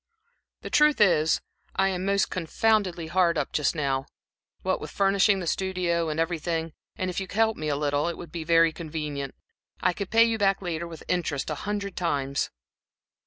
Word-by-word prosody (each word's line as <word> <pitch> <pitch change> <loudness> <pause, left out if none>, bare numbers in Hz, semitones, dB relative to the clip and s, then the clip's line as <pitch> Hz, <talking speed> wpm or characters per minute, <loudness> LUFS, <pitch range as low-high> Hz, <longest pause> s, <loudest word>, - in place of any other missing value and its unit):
"The - - -7
truth 300 -1 +4
is, 165 -6 +4 0.3
I 195 0 +3
am 185 -1 -2
most 200 0 +1
confoundedly 185 0 +1
hard 170 0 +2
up - - -1
just 150 +2 +1
now, 135 -3 -1 0.6
what - - 0
with - - -6
furnishing 195 0 +3
the - - -4
studio 175 -2 0
and 155 +1 -2
everything, 165 -1 -1 0.2
and 185 0 -2
if 180 - -3
you 190 - -4
could 185 - -10
help 225 -1 +3
me 155 - -4
a 145 - +1
little, 145 +1 0
it 170 - -3
would 170 -3 -9
be 170 -2 -4
very 165 0 +4
convenient. 150 -4 -5 0.4
I - - +2
can 200 +2 -4
pay 225 +3 +5
you 230 -1 +1
back 195 -1 +3
later 170 -2 -3
with 165 -2 -10
interest 160 -5 -1
a 150 +7 -5
hundred 200 -2 -3
times." 140 -5 -1
170 Hz, 190 wpm, -26 LUFS, 155-195 Hz, 0.6 s, pay